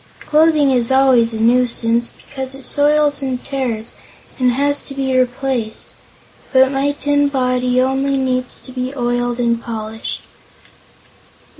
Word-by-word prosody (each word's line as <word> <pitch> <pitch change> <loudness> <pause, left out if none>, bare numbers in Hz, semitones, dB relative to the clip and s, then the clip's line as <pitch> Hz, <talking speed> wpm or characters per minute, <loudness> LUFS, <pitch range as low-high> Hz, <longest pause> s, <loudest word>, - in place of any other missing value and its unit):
Clothing 305 -2 +3
is 245 -1 +2
always 260 -3 +4
a 220 - -5
nuisance, 235 0 +1 0.2
because 265 -1 -6
it 270 - -10
soils 290 +1 +2
and 260 -2 -3
tears 240 -5 -3 0.5
and 250 -1 +3
has 285 +2 +1
to 275 - -10
be 265 -1 -1
replaced; 250 -3 -1 0.6
but 265 0 +4
my 280 +1 0
tin 290 0 +1
body 255 -2 0
only 270 +1 +1
needs 255 -1 -1
to 255 - -12
be 255 +1 -4
oiled 245 -1 -1
and 235 -1 +1
polished. 220 -1 -6
255 Hz, 135 wpm, -18 LUFS, 245-275 Hz, 0.6 s, always